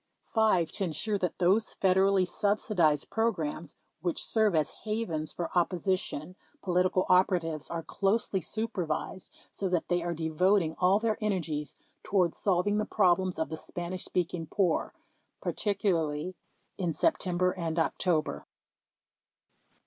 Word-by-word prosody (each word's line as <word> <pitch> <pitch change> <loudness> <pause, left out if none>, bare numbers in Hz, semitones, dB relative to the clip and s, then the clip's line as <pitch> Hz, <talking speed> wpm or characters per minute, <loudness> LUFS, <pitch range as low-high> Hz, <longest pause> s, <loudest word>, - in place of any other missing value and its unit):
5. 190 -8 +3
To - - -3
ensure 200 +4 -1
that 180 -2 -2
those 195 +5 +2
Federally 190 0 +3
subsidized 180 -6 +1
programs 170 -9 -1 0.3
which 175 0 -1
serve 215 -5 +2
as 155 -1 +2
havens 200 -9 -2
for 170 0 -5
opposition 180 -2 -1 0.3
political 185 0 +2
operatives 175 -5 +2
are 165 -1 -3
closely 195 0 0
supervised 190 -5 -3 0.2
so 195 - -3
that 180 -2 -1
they 175 -1 +2
are 170 0 -2
devoting 160 +2 +2
all 185 +2 +4
their 220 0 0
energies 165 -8 -2 0.2
toward 180 -4 +1
solving 200 +2 +1
the 210 - 0
problems 185 -2 +2
of 160 - -1
the 160 - -4
Spanish 175 +3 -5
speaking 170 -2 -2
poor 175 0 +1 0.5
(particularly 180 -5 -1 0.5
in 175 -4 0
September 180 - +1
and 165 -3 -3
October) 165 -1 0
180 Hz, 125 wpm, -29 LUFS, 165-200 Hz, 0.5 s, all